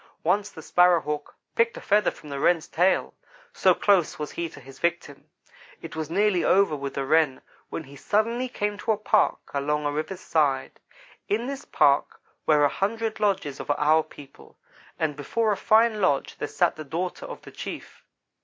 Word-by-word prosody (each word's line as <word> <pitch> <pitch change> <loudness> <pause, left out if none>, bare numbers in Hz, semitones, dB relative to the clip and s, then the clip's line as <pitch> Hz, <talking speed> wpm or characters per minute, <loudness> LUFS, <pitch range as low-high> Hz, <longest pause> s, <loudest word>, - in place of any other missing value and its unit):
Once 195 +5 +1
the 160 - -11
Sparrow 180 +1 +4
hawk 150 -1 -5 0.2
picked 230 0 +1
a - - -5
feather 210 -1 +2
from 150 - -12
the 140 -1 -4
Wren's 165 +2 +2
tail 180 +4 +1 0.4
so - - +4
close 195 -6 +2
was 150 -1 -5
he 170 -1 -4
to 150 - -13
his 135 0 -14
victim. 170 -5 -3 0.5
It - - -9
was 160 -1 -4
nearly 195 0 +2
over 195 -5 +3
with 140 -1 -5
the 135 - -2
Wren, 155 -3 +2 0.3
when 165 - -5
he 140 0 -14
suddenly 230 - 0
came 205 -3 -3
to 220 - +1
a - - -3
park 215 0 +2 0.2
along 150 +1 -1
a 145 - +1
river's 155 +5 -4
side. 140 -7 0 0.5
In 220 +4 0
this 275 +1 -5
park 140 0 +2 0.3
were 150 -2 +5
a - - +6
hundred 220 +7 -2
lodges 190 -9 0
of - - -8
our 155 +2 +4
people, 145 -3 -15 0.4
and 155 -2 -1
before 215 +10 0
a - - +1
fine 220 +1 +3
lodge 145 -7 +1
there - - -2
sat - - +1
the 155 - -6
daughter 175 - -4
of - - -9
the - - -11
chief. - - -8
165 Hz, 190 wpm, -25 LUFS, 145-210 Hz, 0.5 s, a